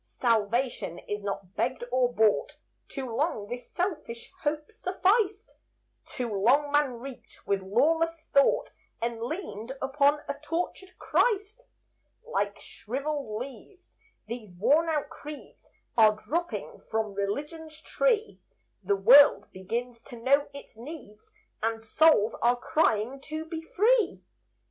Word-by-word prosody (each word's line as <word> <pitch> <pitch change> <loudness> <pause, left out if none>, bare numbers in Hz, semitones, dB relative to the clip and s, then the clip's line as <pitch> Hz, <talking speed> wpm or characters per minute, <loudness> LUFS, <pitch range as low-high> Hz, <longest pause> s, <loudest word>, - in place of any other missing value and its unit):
Salvation 230 -4 0
is 205 +3 -5
not 195 -2 -5
begged 255 0 -1
or 250 -1 +2
bought; 220 -3 +2 0.3
Too 270 -2 -5
long 270 -6 0
this 245 +2 -7
selfish 305 -11 -3
hope 300 +4 -2
sufficed; 400 +1 0 0.5
Too 250 -2 -4
long 260 +9 +3
man 290 -3 +3
reeked 265 +1 -11
with 200 -1 0
lawless 320 +11 +1
thought, 280 - +3 0.3
And 230 0 -3
leaned 255 - -5
upon 285 +2 +2
a - - -1
tortured 355 +4 -4
Christ. 435 +1 0 0.6
Like 205 - -2
shriveled 270 -2 -4
leaves, 275 - -11 0.3
these 215 -4 -8
worn 290 - +3
out 300 -2 -1
creeds 300 -2 -11 0.3
Are 215 -2 +6
dropping 345 +10 -4
from 220 -2 -1
Religion's 300 +11 -4
tree; 450 +1 0 0.4
The 200 +1 +1
world 265 +9 +7
begins 230 +5 -4
to - - -9
know 280 +4 +3
its 280 -4 -12
needs, 235 -4 -11 0.3
And 225 +1 0
souls 225 0 +4
are 240 +1 +4
crying 255 -2 0
to 315 0 -5
be 320 0 -5
free. 430 +6 +2
270 Hz, 125 wpm, -28 LUFS, 225-320 Hz, 0.6 s, world